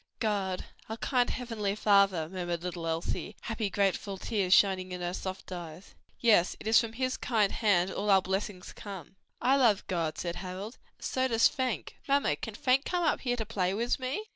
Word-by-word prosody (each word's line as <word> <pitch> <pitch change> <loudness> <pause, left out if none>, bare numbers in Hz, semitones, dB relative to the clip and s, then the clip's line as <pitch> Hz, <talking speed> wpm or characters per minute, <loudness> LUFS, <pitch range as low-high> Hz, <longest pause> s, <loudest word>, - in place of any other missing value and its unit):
"God, 195 -4 -1 0.2
our 220 - -4
kind 245 0 +1
heavenly 220 -5 -2
Father," 200 -6 +3
murmured 175 -1 -4
little 175 -2 -4
Elsie, 165 +5 -2
happy, 220 -2 -2
grateful 195 0 0
tears 195 -2 -1
shining 190 -1 +4
in 180 - -4
her 175 0 -2
soft 190 0 -6
eyes. 175 0 -8 0.3
"Yes, 210 -7 +4
it - - -11
is 220 +1 +6
from 230 -1 -3
his 255 +2 -1
kind 215 -5 +1
hand 190 -4 +2
all 205 +2 -2
our 190 -1 +6
blessings 190 0 -3
come." 195 -2 -9 0.3
"I 265 +3 +4
love 230 -7 +3
God," 165 -4 -2
said 170 -1 -3
Harold, 190 +5 -6 0.2
"and - - -9
so 260 0 +1
does 230 -2 +5
Fank: 255 -4 -3
Mamma, 275 - +2
can 225 - -6
Fank 260 +4 +2
come 355 -1 -1
up 315 - +2
here 245 -2 0
to 220 - -2
play 195 -3 -1
wis 235 +5 0
me?" 260 +11 -2
200 Hz, 190 wpm, -30 LUFS, 185-230 Hz, 0.3 s, is